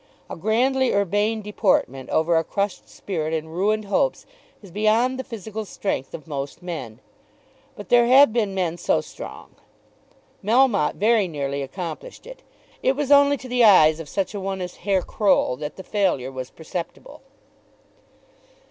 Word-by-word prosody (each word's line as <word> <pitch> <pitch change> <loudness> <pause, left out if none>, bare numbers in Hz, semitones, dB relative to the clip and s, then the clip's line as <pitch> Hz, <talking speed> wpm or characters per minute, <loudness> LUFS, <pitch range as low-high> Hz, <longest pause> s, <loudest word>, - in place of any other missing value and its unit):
A - - -4
grandly 250 +7 +1
urbane 205 +3 0
deportment 185 - 0
over 165 +2 +2
a 165 - +3
crushed 200 +4 -3
spirit 160 -4 -3
and 160 +1 -5
ruined 210 +3 0
hopes - - 0 0.4
is 195 - -13
beyond 220 +6 +1
the - - -3
physical 220 -3 -6
strength 195 -9 -4
of 155 - -10
most 140 +2 -6
men; 150 -11 -6 0.8
but 205 -3 -10
there 240 -1 +5
have 265 -1 +6
been 210 -5 0
men 175 -2 -1
so - - +1
strong. - - -10 0.9
Melmotte 225 - +3
very 215 -1 +2
nearly 140 -3 -3
accomplished 175 - -7
it. - - -11 0.4
It 265 - +2
was 290 0 -2
only 285 0 +6
to 260 - -10
the 250 -1 +2
eyes 160 -7 +6
of 160 -3 -8
such 195 +5 -2
a 205 - -4
one 195 0 -3
as 180 -1 -6
Herr 195 -1 0
Croll 200 - +1
that 150 +1 -6
the 190 - -9
failure 180 -13 0
was 130 -1 -6
perceptible. 170 - -8
200 Hz, 155 wpm, -23 LUFS, 160-225 Hz, 0.9 s, have